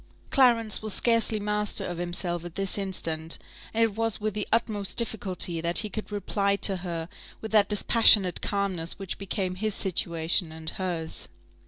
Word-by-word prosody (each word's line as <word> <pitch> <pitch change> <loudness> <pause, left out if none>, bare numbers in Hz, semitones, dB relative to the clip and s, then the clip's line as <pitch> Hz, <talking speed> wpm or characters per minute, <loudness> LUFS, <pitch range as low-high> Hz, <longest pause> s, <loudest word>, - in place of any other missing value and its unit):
Clarence 235 -5 +3
was 215 -2 -3
scarcely 230 -2 +2
master 210 0 -1
of 175 -1 -5
himself 175 -1 -2
at 175 -1 -9
this 195 -1 +3
instant; 165 -5 -3 0.3
and 225 +1 +2
it 220 -3 0
was 225 -1 0
with 215 0 -2
the 210 0 -3
utmost 210 -3 0
difficulty 185 -7 0
that 170 +1 -1
he - - -4
could 215 -1 -6
reply 200 0 0
to 195 -1 +4
her 170 -2 -5 0.3
with 220 - -7
that 210 -2 +4
dispassionate 210 -3 +5
calmness 190 -5 -2
which 195 -2 -5
became 190 -1 -2
his 215 +3 0
situation 170 -2 +1
and 160 0 -6
hers. 175 -4 -3
195 Hz, 165 wpm, -27 LUFS, 175-215 Hz, 0.3 s, dispassionate